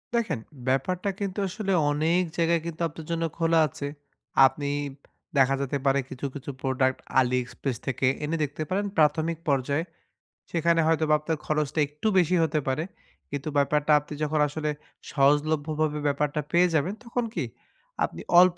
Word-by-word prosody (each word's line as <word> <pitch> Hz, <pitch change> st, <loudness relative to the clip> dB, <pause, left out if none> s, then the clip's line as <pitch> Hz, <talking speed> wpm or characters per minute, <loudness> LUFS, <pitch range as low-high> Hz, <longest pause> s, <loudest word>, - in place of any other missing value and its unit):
দেখেন, 210 Hz, -, 0 dB, 0.3 s
ব্যাপারটা 180 Hz, +9 st, 0 dB
কিন্তু 200 Hz, 0 st, -3 dB
আসলে 195 Hz, +1 st, -3 dB, 0.2 s
অনেক 160 Hz, +4 st, +2 dB, 0.2 s
জায়গায় 170 Hz, 0 st, +2 dB
কিন্তু 170 Hz, -1 st, -6 dB
আপনার 160 Hz, 0 st, -10 dB
জন্য 165 Hz, 0 st, 0 dB
খোলা 165 Hz, -1 st, +3 dB
আছে। 140 Hz, 0 st, -6 dB, 0.6 s
আপনি 140 Hz, +2 st, 0 dB, 0.7 s
দেখা 135 Hz, 0 st, +5 dB
যেতে 140 Hz, +1 st, -1 dB
পারে, 135 Hz, 0 st, +4 dB
কিছু, 130 Hz, -, -6 dB
কিছু 140 Hz, 0 st, -7 dB
product 130 Hz, -1 st, +1 dB, 0.2 s
AliExpress 125 Hz, 0 st, -1 dB
থেকে 135 Hz, 0 st, +1 dB, 0.2 s
এনে 155 Hz, +3 st, -1 dB
দেখতে 145 Hz, +2 st, -3 dB
পারেন 200 Hz, +2 st, 0 dB
প্রাথমিক 160 Hz, +2 st, +3 dB
পর্যায়ে। 140 Hz, +3 st, +1 dB, 0.7 s
সেখানে 170 Hz, 0 st, +2 dB
হয়তোবা 160 Hz, -1 st, +3 dB
আপনার 155 Hz, +1 st, -2 dB
খরচটা 150 Hz, 0 st, 0 dB
একটু 150 Hz, +8 st, -4 dB
বেশি 180 Hz, 0 st, +4 dB
হতে 155 Hz, -1 st, +1 dB
পারে। 135 Hz, +4 st, 0 dB, 0.5 s
কিন্তু 140 Hz, +1 st, -4 dB
ব্যাপারটা, 150 Hz, +1 st, +2 dB
আপনি 150 Hz, +1 st, -10 dB
যখন 155 Hz, 0 st, 0 dB
আসলে 150 Hz, +1 st, -3 dB, 0.4 s
সহজলভ্য 145 Hz, +2 st, +2 dB
ভাবে 150 Hz, -1 st, +1 dB
ব্যাপারটা 145 Hz, +1 st, 0 dB
পেয়ে 175 Hz, +1 st, +5 dB
যাবেন, 155 Hz, +6 st, +1 dB
তখন 240 Hz, 0 st, -2 dB
কি 165 Hz, -7 st, -1 dB, 0.6 s
আপনি -, -, -8 dB, 0.2 s
অল্প 180 Hz, -1 st, +4 dB
150 Hz, 150 wpm, -26 LUFS, 140-165 Hz, 0.7 s, দেখা